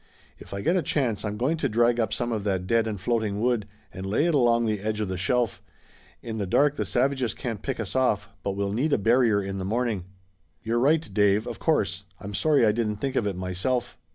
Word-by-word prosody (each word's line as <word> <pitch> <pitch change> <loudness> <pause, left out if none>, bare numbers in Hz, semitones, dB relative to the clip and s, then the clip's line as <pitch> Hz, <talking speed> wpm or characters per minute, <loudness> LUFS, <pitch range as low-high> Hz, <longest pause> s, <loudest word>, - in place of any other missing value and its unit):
"If - - -13
I 100 - -4
get 170 - +2
a 185 - +3
chance 125 -10 -1
I'm 105 -1 -3
going 135 +8 +1
to - - -1
drag 120 +2 +3
up 110 -4 0
some 120 - -2
of 110 -3 -2
that 95 -3 -1
dead 115 +3 +2
and 105 -3 -3
floating 110 -1 -1
wood 115 -3 +1 0.3
and 95 - -7
lay 105 +11 +1
it 170 - +2
along 120 -4 +3
the 105 -2 0
edge 105 +1 -2
of 105 -3 -2
the 95 - -2
shelf. 120 +5 0 0.6
In 110 -2 -4
the 100 - -2
dark 145 +9 +3
the - - -2
savages 130 -2 0
can't 115 -4 -4
pick 135 0 -3
us 110 0 -4
off, 105 -6 +2
but 100 - -2
we'll 100 0 -1
need 140 +7 +1
a - - +4
barrier 115 -1 +3
in 95 0 -4
the - - -3
morning." 110 -2 -1 0.6
"You're 115 +2 0
right, 155 +5 +3
Dave, 105 +1 +3
of 120 -1 -6
course. 100 - 0 0.2
I'm 100 +1 -7
sorry 145 +3 +3
I 105 - +5
didn't 105 -1 -1
think 135 +5 -3
of 105 - +1
it 100 - -2
myself." 95 +7 -2
110 Hz, 240 wpm, -26 LUFS, 100-125 Hz, 0.6 s, I